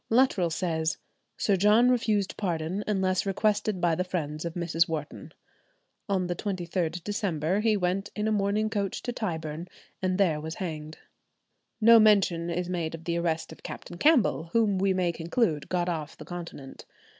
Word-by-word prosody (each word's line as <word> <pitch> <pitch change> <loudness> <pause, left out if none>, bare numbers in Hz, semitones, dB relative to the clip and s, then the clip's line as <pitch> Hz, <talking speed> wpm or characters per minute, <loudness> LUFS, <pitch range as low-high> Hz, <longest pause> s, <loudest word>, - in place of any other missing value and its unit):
Luttrell 225 -7 +3
says, 160 -1 -1 0.4
"Sir 200 - +2
John 210 +6 +5
refused 215 -5 +1
pardon 175 +1 -2
unless 190 -2 +1
requested 205 0 0
by 175 -1 +2
the 180 +3 0
friends 155 -4 -4
of 170 - -4
Mrs. 170 -1 +1
Wharton. 155 -2 -5 0.8
On 190 -2 +1
the 175 0 -2
23d 175 -3 -2
December, 190 -4 -1
he 215 -1 +2
went 195 +2 -1
in 210 0 -1
a - - +1
mourning 205 +1 +1
coach 200 -3 -2
to 245 - -3
Tyburn, 165 -7 -4 0.3
and 185 -1 0
there 165 -7 +2
was 160 +1 -5
hanged." 155 -4 -5 0.8
No 230 +1 +8
mention 195 -6 +4
is 175 +1 -2
made 170 -3 -2
of 165 - -11
the 170 0 -1
arrest 165 -2 -1
of 160 - -12
Captain 175 - -8
Campbell, 250 - +3
whom 215 -4 +3
we 195 0 +2
may 185 -2 +1
conclude 165 - -1
got 180 -1 0
off 160 -4 -4
the - - -10
continent. 170 -6 -8
180 Hz, 170 wpm, -28 LUFS, 165-205 Hz, 0.8 s, No